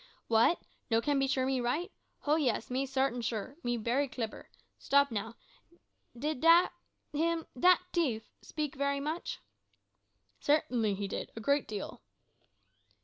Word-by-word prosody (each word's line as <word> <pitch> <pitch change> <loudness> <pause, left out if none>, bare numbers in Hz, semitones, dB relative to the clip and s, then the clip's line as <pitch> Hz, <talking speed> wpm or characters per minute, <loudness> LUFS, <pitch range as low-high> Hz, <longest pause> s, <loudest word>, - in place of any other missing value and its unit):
"W'at, 230 +10 +5 0.3
no 225 -1 +4
can 285 +3 +1
be 270 - +2
sure 265 -1 +1
me 265 -1 0
right? 270 +9 -1 0.3
ho, 300 +1 +2
yis, 250 -7 0
me 265 +2 0
sartin 265 -2 0
sure. 230 +4 -3
Me 240 0 -1
bery 245 +6 +1
clibber. 230 -4 -6 0.3
Stop, 280 -1 +3
now. 225 +1 -3 0.8
Did 300 +2 -2 0.7
him 330 +2 0
dat 365 +3 +6
tief! 255 -11 0
speak 300 -3 -4
bery 280 0 +1
mush?" 330 - -3 1.0
"Certainly 245 -8 +2
he 200 +1 -3
did, - - -5
a - - -5
good 280 +5 +1
deal." 210 -2 -6
270 Hz, 140 wpm, -32 LUFS, 230-295 Hz, 1.0 s, dat